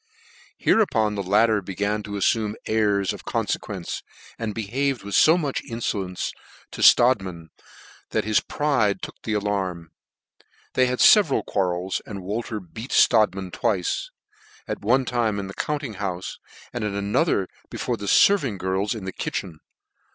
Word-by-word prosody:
Hereupon 110 - +2
the 100 - -2
latter 105 +3 +3
began 100 +3 -2
to 105 0 -8
afl'ume 105 +1 +1
airs 105 -3 +1
of - - -10
confequence, - - -3 0.4
and 110 -2 -3
behaved 125 +4 -1
with 100 0 -7
fo 160 +3 +6
much 145 -6 -2
infolencc 100 -6 -3 0.4
to - - -7
Strodtman, 95 -10 +4 0.6
that - - 0
his 110 0 +3
pride 120 -10 0
took - - -8
the 110 - -3
alarm. 95 -5 -2 0.8
They 130 0 +3
had 125 0 -1
feveral 200 -10 +6
quarrels, 90 -1 -1
and 100 -4 -8
Wolter 110 +3 -3
beat 110 +7 -9
Strodtman 100 -5 +3
twice; 95 -2 -1 0.6
at - - -4
one 125 +5 +2
time 115 -4 0
in 100 - -3
the 95 - -8
compting 145 -7 -3
houfe, 95 -2 -4 0.4
and 120 - -3
at' 105 -2 -2
another 100 - +1 0.2
before - - -2
the 100 - -7
fervant 140 - +4
girls 95 +4 -1
in 105 -4 -7
the 95 - -3
kitchen. 85 -5 -4
105 Hz, 145 wpm, -24 LUFS, 95-120 Hz, 0.8 s, fo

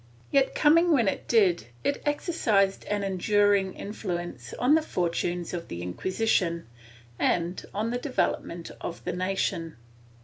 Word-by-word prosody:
Yet, 275 -1 +3
coming 335 +3 +5
when 245 -9 +4
it - - -2
did, 190 - +3 0.2
it 285 - 0
exercised 220 - +1
an 205 -1 -1
enduring 195 0 +2
influence 175 - -5
on 255 +4 +3
the 320 - +5
fortunes 175 - -2
of 170 -1 -4
the 85 0 -6
Inquisition, 175 - 0 0.5
and 175 +1 0
on 220 +3 -2
the 245 - -1
development 175 - -2
of 170 - -6
the - - -2
nation. 180 -3 -1
195 Hz, 135 wpm, -27 LUFS, 175-230 Hz, 0.5 s, coming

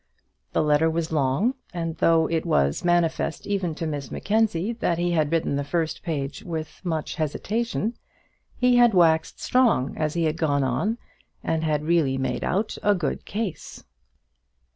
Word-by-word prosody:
The - - +2
letter 150 +2 +3
was 165 0 -2
long, 150 - +1 0.2
and 165 -2 -3
though 165 0 +4
it 160 0 -1
was 70 - +1
manifest 175 -2 +1
even 190 -5 -1
to 165 - -4
Miss 145 -5 -4
Mackenzie 215 -1 0
that 195 -7 -1
he 175 +1 0
had 155 -3 +1
written 160 -4 +1
the 145 - -1
first 160 +2 -2
page 140 -4 -4
with 160 -3 -6
much 160 -4 -2
hesitation, 215 - -2 0.6
he 250 -1 +4
had 240 -4 +5
waxed 160 -2 +3
strong 235 - +2
as 155 0 -2
he 170 - +1
had 155 0 0
gone 145 -4 +1
on, 155 - 0 0.5
and 160 0 -1
had 150 -1 0
really 155 -5 +2
made 130 -2 -2
out 205 +4 -1
a 205 0 +3
good 175 -4 -3
case. 200 -7 -5
165 Hz, 165 wpm, -25 LUFS, 150-185 Hz, 0.6 s, had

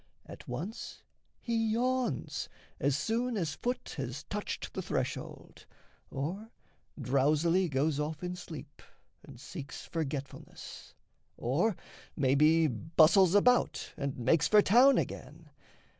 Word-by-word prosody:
At - - -12
once 205 +9 -6 0.4
He 225 -2 0
yawns, 250 - -1 0.3
as 140 0 +1
soon 230 +8 -1
as 165 -6 -1
foot 245 +9 -4
has 130 0 -4
touched 210 0 -5
the - - -3
threshold, - - -5 0.4
Or 180 +11 -4 0.5
drowsily 150 +7 +2
goes 145 +2 0
off 150 +2 -3
in 180 0 -3
sleep 150 -5 -10 0.4
and 120 - -13
seeks 140 +1 -8
Forgetfulness, 145 -4 -6 0.4
or 170 - +1 0.4
maybe 150 +4 +4
bustles 160 - +4
about 245 +4 +3
And 140 -1 -3
makes 140 +7 +3
for 210 -1 +6
town 250 +7 +6
again. - - -5
160 Hz, 115 wpm, -31 LUFS, 140-210 Hz, 0.5 s, for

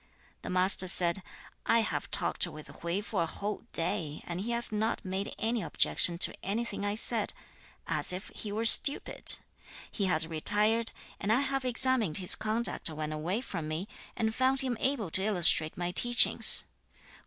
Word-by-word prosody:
The - - -8
Master 185 +1 +3
said, 175 0 +2 0.5
'I 230 0 +3
have 220 - -5
talked - - 0
with 155 -2 -12
Hui 170 +4 -3
for 210 -3 -4
a 165 - -2
whole 205 +6 -7
day, 155 -2 -4
and 175 +1 -6
he 220 - -6
has 235 -1 0
not 215 0 -3
made 190 +2 -5
any 225 +1 -2
objection 170 -3 +2
to - - +3
anything 210 +1 -5
I 205 0 -3
said; 220 -1 -1 0.5
as - - +1
if 185 +2 -7
he 210 - -8
were 220 +2 -4
stupid. 275 +5 +4 0.5
He 200 - -3
has 160 -3 +2
retired, 210 +8 -1 0.3
and 205 - -3
I 245 +4 +2
have 270 -1 -3
examined 245 -8 +3
his 185 -2 +8
conduct 220 -3 -2
when 155 -1 -6
away 175 +9 -4
from 165 -11 -7
me, 160 +5 -5 0.3
and 220 -1 -2
found 260 +3 +1
him 255 -2 -3
able 245 - -2
to 190 - -1
illustrate 175 -6 +2
my 175 0 -4
teachings. 240 +6 +6
205 Hz, 170 wpm, -28 LUFS, 175-230 Hz, 0.5 s, his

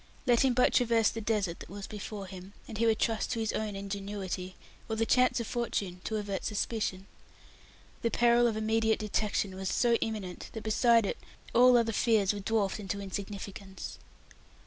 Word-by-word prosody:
Let 240 -3 +4
him 260 -2 +3
but 250 - +4
traverse 230 -3 +4
the 225 - -5
desert 205 -6 -1
that - - -10
was 200 +1 -7
before 210 -1 -6
him, 190 +1 -10
and 220 -2 -6
he 230 - +3
would 220 -1 +3
trust 225 -1 0
to 230 - -2
his 220 -1 -1
own 215 -2 -2
ingenuity, 195 -2 -4 0.3
or 220 - -1
the 225 +1 +1
chance 250 +1 +3
of 235 - -2
fortune, 200 -6 -2
to 220 - -2
avert 200 -2 -3
suspicion. 210 -3 -2 1.0
The 230 - +1
peril 240 +1 +4
of 220 -2 -1
immediate 220 0 +2
detection 210 -2 -1
was 190 0 -3
so 240 -1 +2
imminent 205 -5 -4
that, 220 - -6
beside 230 +1 +4
it, - - -3 0.3
all 250 +1 +7
other 225 -1 +1
fears 215 -3 +3
were 205 - -5
dwarfed 205 0 0
into 200 0 -4
insignificance. 195 0 -6
215 Hz, 180 wpm, -30 LUFS, 195-230 Hz, 1.0 s, all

